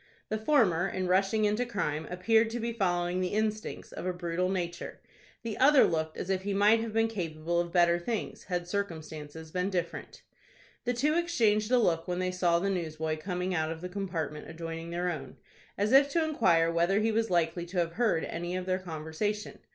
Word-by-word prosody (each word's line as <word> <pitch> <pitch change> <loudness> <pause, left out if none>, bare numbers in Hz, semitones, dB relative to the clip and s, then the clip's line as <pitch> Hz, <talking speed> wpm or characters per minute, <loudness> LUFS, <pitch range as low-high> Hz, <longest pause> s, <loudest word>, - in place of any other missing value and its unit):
The 215 - 0
former, 215 - +3
in 185 0 -2
rushing 195 +4 +2
into 210 +4 +1
crime, 160 -10 -2
appeared 220 +5 +3
to 235 +2 -4
be 235 0 -2
following 180 -3 0
the 185 +2 -1
instincts 215 0 -2
of - - -7
a - - +1
brutal 175 +1 -1
nature. 175 -2 -4 0.4
The 225 -2 -4
other 280 +1 +7
looked 160 -1 0
as 190 - -3
if 190 -1 0
he 200 +1 -2
might 210 +3 +5
have 225 0 -3
been 225 +1 +2
capable 170 -5 -2
of 170 0 -2
better 175 -1 +4
things, 220 +5 -4
had 175 -2 -2
circumstances 160 -5 -5
been 180 +2 -1
different. 175 -3 -4 0.6
The 245 0 0
two 290 +6 +2
exchanged 230 -11 +2
a 250 - +6
look 170 -8 +1
when 180 -1 -1
they 185 0 0
saw 175 -2 +2
the 195 +3 0
newsboy 160 -3 -2
coming 180 +2 -2
out 160 -2 0
of 165 - -5
the 180 - -5
compartment 175 -6 -4
adjoining 165 0 -6
their 175 +1 -1
own, 135 -5 -7 0.4
as 205 +2 +1
if 275 +1 +7
to 335 - +3
inquire 170 - +3
whether 170 +4 +2
he 220 +1 +2
was 225 +1 0
likely 175 0 0
to 180 +2 -6
have 170 -1 +1
heard 205 -4 +1
any 175 +2 -4
of 185 0 -3
their 185 0 0
conversation. 175 +5 -4
180 Hz, 200 wpm, -30 LUFS, 170-215 Hz, 0.6 s, other